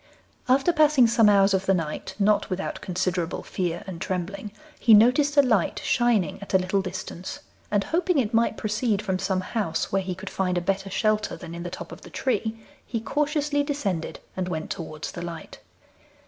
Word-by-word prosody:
After 270 +7 +4
passing 300 -5 +5
some 225 -2 +5
hours 200 -1 +5
of 190 0 0
the 195 - +4
night, 160 -3 -4
not 210 0 +2
without 190 0 -3
considerable 180 -2 -2
fear 175 -2 -3
and 180 -3 -7
trembling, 190 +3 -3 0.3
he 225 -3 +7
noticed 275 +7 +4
a 285 - +8
light 220 -9 +1
shining 235 - +2
at 200 - -3
a - - +9
little 190 +2 0
distance, 185 -1 -6 0.3
and 205 -1 +2
hoping 355 - +1
it 235 -4 +1
might 230 -1 +2
proceed 210 -1 0
from 190 -3 -1
some 190 -1 0
house 185 -5 -2
where 195 - +2
he 185 -1 -4
could 190 +1 -8
find 180 -2 0
a - - +3
better 195 +2 -1
shelter 215 +2 0
than 165 - -9
in 170 - -6
the 175 - -4
top 185 - -8
of - - -10
the - - -12
tree, 225 -3 -1 0.3
he 230 - -3
cautiously 290 +3 0
descended 230 - -2 0.2
and 185 -1 -2
went 160 -2 -4
towards 155 -2 -5
the 175 - -7
light. 170 -1 -7
195 Hz, 190 wpm, -25 LUFS, 185-235 Hz, 0.3 s, a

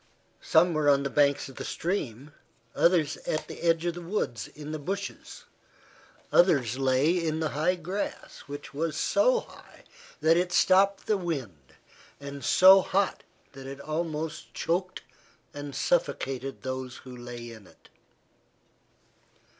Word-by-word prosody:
Some 170 +2 +4
were 155 -2 +2
on 140 -1 +4
the 140 - -3
banks 145 -1 +2
of 135 - -13
the - - -5
stream, 145 - -3 0.4
others 170 -4 +2
at 155 - -3
the - - -9
edge 165 0 +2
of 175 - 0
the 175 - -8
woods 165 - -3
in 150 0 -9
the 155 - -4
bushes. 195 +7 -6 0.9
Others 135 - +3
lay 135 +7 +2
in 160 -1 -1
the 160 -1 0
high 155 +6 +1
grass 180 +4 -5
which 145 0 -8
was 155 +1 -2
so 475 +10 +3
high - - -17 0.4
that 165 +1 +4
it 180 0 0
stopped 195 +2 +4
the 215 - +2
wind, 125 - -5 0.4
and 140 0 -8
so 190 +1 +7
hot 195 +1 0 0.3
that 135 -1 -10
it 135 +1 -8
almost 155 +1 -4
choked 180 +3 -2 0.5
and 145 -1 -7
suffocated 135 - -1
those 130 -1 -5
who 130 -1 -9
lay 120 -1 -8
in 110 -4 -13
it. - - -22
155 Hz, 145 wpm, -28 LUFS, 135-175 Hz, 0.9 s, so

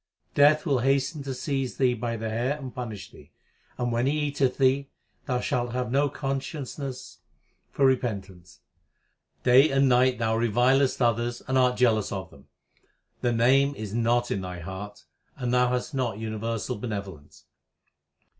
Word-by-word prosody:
Death 150 +2 +5
will 140 -5 +2
hasten 135 +3 +1
to 135 -1 -4
seize 135 0 -3
thee 130 -2 +3
by 115 0 -3
the 110 0 -4
hair 120 +6 -1
and 130 -4 -8
punish 110 -6 -7
thee; - - -16 0.5
and, 120 -1 -1
when 120 +2 +1
he 150 +2 +1
eateth 140 -3 0
thee, 135 +1 +2 0.4
thou 125 -1 0
shalt 125 -4 -2
have 125 -2 -2
no 140 +2 +2
con 135 -1 -2
sciousness 135 -2 -7 0.5
for 140 - +1
repentance. 100 -9 -2 0.8
Day 130 +5 +6
and 135 0 +3
night 125 0 +4
thou 110 -1 0
revilest 125 +4 +2
others 120 +1 0
and 130 - -1
art 125 -1 +3
jealous 110 -5 +2
of 95 -1 -5
them; - - -18 0.7
the 120 - +1
Name 135 +5 +3
is 105 -4 -6
not 120 +1 +1
in 100 - -1
thy 90 -1 -6
heart, 95 +2 -8 0.3
and 125 -2 -2
thou 125 0 +3
hast 125 +4 -2
not 125 -6 -1
universal 110 0 -3
benevolence. 100 -10 -7
125 Hz, 160 wpm, -26 LUFS, 115-135 Hz, 0.8 s, Day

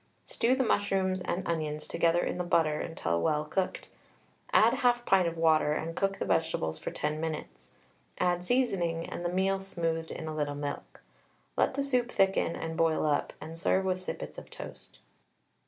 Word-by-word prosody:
Stew 245 +3 +1
the 265 - +2
mushrooms 190 -4 +1
and 180 +1 -2
onions 155 -2 -2
together 170 +1 +2
in - - -2
the - - +1
butter 160 -3 +2
until 85 - -1
well 150 - +1
cooked, 185 +4 -2 0.6
add - - +6
1/2 240 -1 +2
pint 190 -3 +4
of 165 0 -3
water, 155 -2 +4
and 165 +2 -3
cook 195 0 0
the - - -2
vegetables 160 - 0
for - - -4
10 150 +1 -2
minutes. 65 - -5 0.5
Add 175 0 +1
seasoning, 180 -8 +1
and - - -5
the 175 - 0
meal 190 +2 +1
smoothed 165 -4 -2
in 160 - -6
a 155 - -3
little 145 -1 -1
milk. 145 0 -6 0.5
Let - - +2
the 280 - 0
soup 250 -3 +1
thicken 195 -3 +2
and 165 0 -4
boil 165 -1 +2
up, 145 -1 +1
and 160 +1 -8
serve 190 +2 +2
with 185 -1 0
sippets - - -6
of - - -14
toast. - - -10
165 Hz, 180 wpm, -30 LUFS, 155-190 Hz, 0.6 s, add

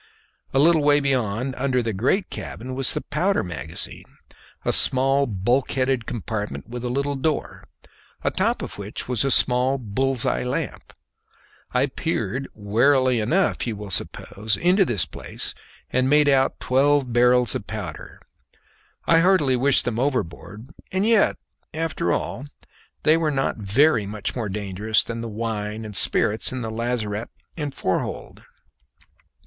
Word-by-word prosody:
A - - -1
little 160 +3 +5
way 145 0 +4
beyond, 130 -2 -1
under 130 -2 +1
the 115 -1 -2
great 135 - 0
cabin, 130 +3 -6
was 135 0 +3
the - - -1
powder 180 +7 0
magazine, 80 -3 -7 0.5
a - - +1
small 135 +2 +3
bulkheaded 125 +4 0
compartment 110 -3 -4
with 120 +1 -7
a 125 - -2
little 140 +3 -1
door, 150 +3 -2 0.6
atop - - 0
of - - -7
which - - -5
was 125 -3 0
a 135 - +1
small 130 +1 +3
bull's 130 +2 0
eye 125 - 0
lamp. 125 - -4 0.8
I 125 +2 +2
peered 135 - -3
warily 125 +4 +2
enough, 140 - +1
you 115 - -2
will 105 -1 -6
suppose, 105 +3 0
into 185 +3 +4
this 110 - 0
place, - - -6 0.4
and 130 +1 +1
made 150 0 +5
out 135 -1 +2
twelve 135 -1 +2
barrels 125 0 +4
of - - -5
powder. - - -7 0.8
I 165 - +5
heartily 165 -7 +3
wished 135 +2 +3
them 120 -2 -2
overboard; 125 - -3 0.2
and 190 +2 0
yet, 225 -2 +3 0.4
after 160 - -1
all, 135 +10 -3 0.6
they 155 +1 +5
were 165 -2 0
not 135 -2 -1
very 110 +2 +2
much 105 0 -3
more 115 -5 -3
dangerous 105 +2 0
than 115 0 -5
the 115 - -5
wine 110 0 -4
and 105 -2 -8
spirits 110 +3 +2
in 130 -1 -4
the 110 - -4
lazarette 115 -2 -3 0.3
and 150 -3 -4
fore 95 -8 -1
hold. - - -7
125 Hz, 150 wpm, -23 LUFS, 110-140 Hz, 0.8 s, little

